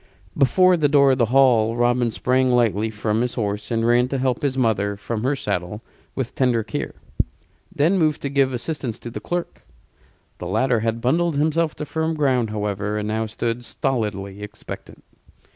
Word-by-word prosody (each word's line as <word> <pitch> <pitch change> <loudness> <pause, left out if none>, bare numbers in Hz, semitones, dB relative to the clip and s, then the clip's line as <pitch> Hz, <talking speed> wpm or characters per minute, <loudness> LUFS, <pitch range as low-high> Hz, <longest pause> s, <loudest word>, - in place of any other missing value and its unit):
Before 180 +6 +4
the 150 -3 +2
door 140 -1 +5
of 130 - +1
the 120 - +4
hall 120 -3 +4
Robin 120 0 +2
sprang 130 +3 +1
lightly 110 -3 +2
from 110 +1 -1
his 125 0 -2
horse 105 -2 -3
and 115 -1 0
ran 120 +1 +4
to 135 - -2
help 130 0 0
his 140 -3 -1
mother 105 -5 +1
from 110 +2 -4
her 135 +4 +1
saddle 100 -2 -3 0.3
with 130 -3 -3
tender 125 -4 +1
care: - - -5 0.8
then 170 +3 +2
moved 155 -3 +1
to 140 - -1
give 135 -1 +2
assistance 125 -2 -3
to 120 - -8
the - - -5
clerk. 175 0 -4 0.8
The 90 - -5
latter 115 +5 +1
had 115 +1 -2
bundled 165 +5 +1
himself 155 +2 +1
to 150 - -5
firm 160 +1 -2
ground, 130 -6 +1
however, 105 0 -2
and 105 0 -2
now 110 +1 -1
stood 115 +2 -3
stolidly 105 -7 -3
expectant. 105 0 -9
120 Hz, 175 wpm, -22 LUFS, 110-140 Hz, 0.8 s, door